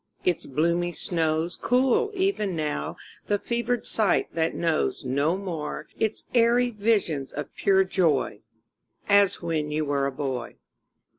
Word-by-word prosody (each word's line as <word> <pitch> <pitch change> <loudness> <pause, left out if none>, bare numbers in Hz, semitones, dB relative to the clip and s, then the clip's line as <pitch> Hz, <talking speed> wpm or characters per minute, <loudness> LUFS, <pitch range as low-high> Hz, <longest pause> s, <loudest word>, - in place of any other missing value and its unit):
Its 180 -2 0
bloomy 170 +5 +1
snows 165 -1 -1
Cool 265 - +3
even 370 - 0
now 150 - -3 0.3
the 205 - +2
fevered 235 +2 -2
sight 210 -5 +1
that 165 0 0
knows 165 -4 0
No 140 +7 +1
more 170 -6 -5
its 220 -1 -1
airy 240 +1 +4
visions 200 - 0
of 145 0 -6
pure 190 -1 +4
joy 160 - +1 0.7
As 200 -2 +4
when 160 -3 -1
you 155 +1 -1
were 140 -1 0
a - - -2
boy. 130 -3 -4
170 Hz, 135 wpm, -26 LUFS, 150-210 Hz, 0.7 s, airy